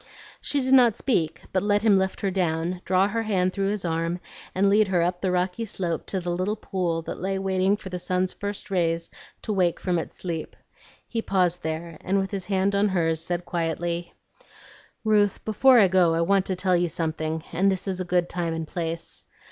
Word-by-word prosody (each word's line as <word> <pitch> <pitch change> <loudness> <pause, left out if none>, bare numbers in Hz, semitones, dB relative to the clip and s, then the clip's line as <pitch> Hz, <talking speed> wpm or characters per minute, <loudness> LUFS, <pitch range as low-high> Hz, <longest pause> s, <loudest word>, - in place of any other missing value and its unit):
She 285 - 0
did 260 +1 +1
not 245 -5 +6
speak, 165 - -1
but 185 - +2
let 205 0 +2
him 215 -3 +5
lift 190 0 -2
her 195 - 0
down, 175 -1 -1
draw 185 +1 +3
her 225 +3 -1
hand 185 -4 +1
through 195 -1 0
his 205 -3 -3
arm, 165 +1 -1 0.4
and 195 +2 +3
lead 205 +1 +4
her 180 -3 +2
up 180 +1 -1
the 190 - +1
rocky 180 +4 0
slope 180 -6 -3
to 190 - -2
the 175 -1 -3
little 185 +4 -1
pool 180 -6 -2
that - - -6
lay 195 +2 -1
waiting 190 +1 +1
for 195 - -9
the 180 -1 -4
sun's 180 +1 -1
first 205 0 -6
rays 165 -2 0 0.3
to 215 - -2
wake 180 -3 +1
from 180 -2 0
its - - -7
sleep. 165 -3 -5 0.5
He 230 - -2
paused 180 -4 +1
there, 160 +1 -4
and 195 +2 0
with 195 0 -1
his 190 -3 -4
hand 195 0 +1
on 200 +1 +3
hers 165 -4 0
said 175 0 -3
quietly, 170 0 -2 0.9
"Ruth, 210 -2 +2
before 250 +4 +5
I 200 - +7
go 175 -3 +3
I 165 - +1
want 195 +2 +2
to 190 - -1
tell 185 0 +1
you 175 0 +1
something, 160 0 -2
and 190 +4 +3
this 190 +1 -3
is 185 -1 -2
a - - 0
good 175 -1 +1
time 170 -2 -2
and 160 -1 -4
place. 165 -1 -5
185 Hz, 210 wpm, -25 LUFS, 170-195 Hz, 0.9 s, I